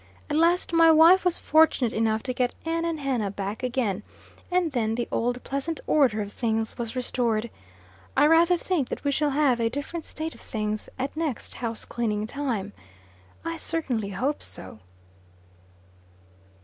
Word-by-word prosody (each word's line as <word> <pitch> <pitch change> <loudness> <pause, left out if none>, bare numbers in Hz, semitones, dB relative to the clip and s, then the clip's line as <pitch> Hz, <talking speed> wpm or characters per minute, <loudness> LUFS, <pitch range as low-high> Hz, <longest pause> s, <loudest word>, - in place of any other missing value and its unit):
At - - +1
last 335 +2 +2
my 330 0 +6
wife 325 +4 +7
was 360 -1 +1
fortunate 310 -6 +3
enough 220 0 +1
to 255 - -2
get 245 0 0
Ann 330 +1 -1
and 330 -2 -2
Hannah 255 -7 -1
back 200 +2 -5
again, 240 -6 -1 0.5
and 360 -3 +1
then 225 -4 0
the 240 0 -2
old 245 +2 -1
pleasant 280 +4 -3
order 245 -8 +3
of 205 - -9
things 225 -2 -1
was 235 0 -5
restored. 235 -3 0 0.7
I - - +6
rather 335 +3 +5
think 335 -6 -1
that - - -5
we 285 - +1
shall 295 +1 +1
have 275 -4 +2
a 230 -1 +2
different 285 +6 -5
state 315 +1 -5
of - - -16
things 215 -2 -3
at 270 +3 -3
next 310 -7 -3
house 230 -2 -4
cleaning 215 -3 -2
time. 225 -6 -3 0.7
I 330 0 -3
certainly 260 -12 -2
hope 255 +10 -2
so. 95 +3 -7
255 Hz, 160 wpm, -26 LUFS, 225-320 Hz, 0.7 s, wife